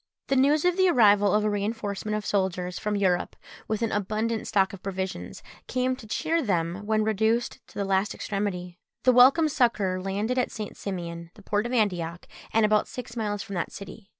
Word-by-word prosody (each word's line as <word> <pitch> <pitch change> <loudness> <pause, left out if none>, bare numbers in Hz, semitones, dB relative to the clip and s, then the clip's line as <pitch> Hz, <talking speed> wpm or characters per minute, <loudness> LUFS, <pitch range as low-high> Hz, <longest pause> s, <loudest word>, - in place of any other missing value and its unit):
The 270 - +3
news 290 +4 +3
of 360 0 +2
the 375 -1 +5
arrival 205 - +5
of 210 +1 +2
a 215 - +2
reinforcement 210 0 -2
of 215 - -6
soldiers 180 -2 -1
from 210 0 -1
Europe, 185 -3 +1 0.3
with 220 +1 -1
an 225 - 0
abundant 215 +2 -1
stock 195 -2 +2
of 195 - -9
provisions, 190 - -5 0.2
came 255 0 0
to 235 -4 -12
cheer 325 +9 0
them 185 - -1
when 215 0 +2
reduced 220 +2 0
to - - -19
the 200 - -1
last 195 +1 +1
extremity. 180 -4 -4 0.2
The 255 - +6
welcome 265 +6 +6
succour 215 -10 +1
landed 205 +6 -1
at 250 - 0
St. 215 -2 -6
Simeon, 170 -3 -5
the 205 - -16
port 210 +3 0
of - - -6
Antioch, 180 -8 0 0.3
and 225 -1 +4
about 210 0 +2
six 245 -2 -8
miles 205 -3 -2
from 200 - -8
that 175 - -2
city. 200 +1 -10
210 Hz, 195 wpm, -26 LUFS, 190-230 Hz, 0.3 s, The